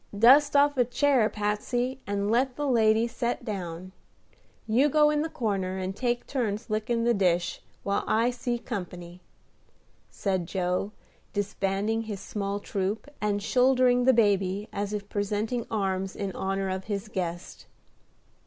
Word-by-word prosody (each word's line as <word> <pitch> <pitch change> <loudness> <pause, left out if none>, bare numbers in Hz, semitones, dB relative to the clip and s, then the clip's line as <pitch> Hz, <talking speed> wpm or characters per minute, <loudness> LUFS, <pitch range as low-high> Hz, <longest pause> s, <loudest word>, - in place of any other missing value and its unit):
Dust 275 +7 +6
off 285 0 +4
a 250 - +5
chair, 250 -2 +2
Patsey, 240 +5 -2
and 200 +1 -1
let 250 +2 +2
the 290 - -2
lady 225 -3 +3
set 235 +1 -3
down. 185 -4 -5 0.7
You 250 +7 +3
go 300 +1 +4
in 300 0 +1
the 320 - -2
corner, 195 -8 -2
and 190 0 -3
take 240 +1 -1
turns 230 -4 -2
lickin' 230 +2 0
the 240 0 +3
dish, 180 -4 +1 0.2
while 200 0 0
I 230 +3 +2
see 245 0 -2
company," 180 -6 -7 0.9
said 185 -4 -2
Joe, 185 +2 -1 0.4
disbanding 205 +2 -1
his 215 -3 -5
small 200 0 -3
troop, 205 +7 -3
and 205 -1 0
shouldering 250 0 +3
the 260 - +7
baby 200 -2 +2
as 200 0 -2
if 205 -1 -4
presenting 210 +4 -2
arms 195 -3 -1
in 200 -1 -3
honor 195 +1 -2
of 190 0 -3
his 205 -1 -3
guest. 175 -3 -5
210 Hz, 145 wpm, -27 LUFS, 195-245 Hz, 0.9 s, the